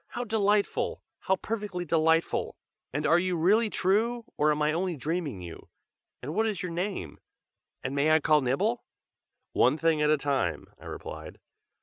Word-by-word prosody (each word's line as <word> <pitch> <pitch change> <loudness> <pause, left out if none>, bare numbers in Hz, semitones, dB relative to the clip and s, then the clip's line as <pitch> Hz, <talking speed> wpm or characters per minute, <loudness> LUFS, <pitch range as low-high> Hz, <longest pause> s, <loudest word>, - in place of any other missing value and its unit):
"How 245 - -4
delightful! 210 -2 0 0.2
how 190 - +1
perfectly 205 -3 -4
delightful! 160 0 +1 0.3
and 145 +3 -2
are 165 +2 +5
you 180 -1 0
really 210 +7 +3
true, 225 +6 +1
or 150 +1 +2
am 150 - -1
I 150 0 +2
only 180 +1 -1
dreaming 145 - -3
you? 85 -1 -10 0.5
and 145 +5 -4
what 220 +4 +1
is 205 -4 -2
your 180 - -3
name? 170 - -4 0.6
and 130 - -3
may 140 +2 +2
I 155 0 +5
call 150 0 +3
Nibble?" 195 - 0 0.7
"One 130 +5 +3
thing 160 -1 +2
at 150 - +3
a 155 - +4
time!" 135 - -1
I - - -14
replied. - - -8
165 Hz, 165 wpm, -28 LUFS, 150-200 Hz, 0.7 s, are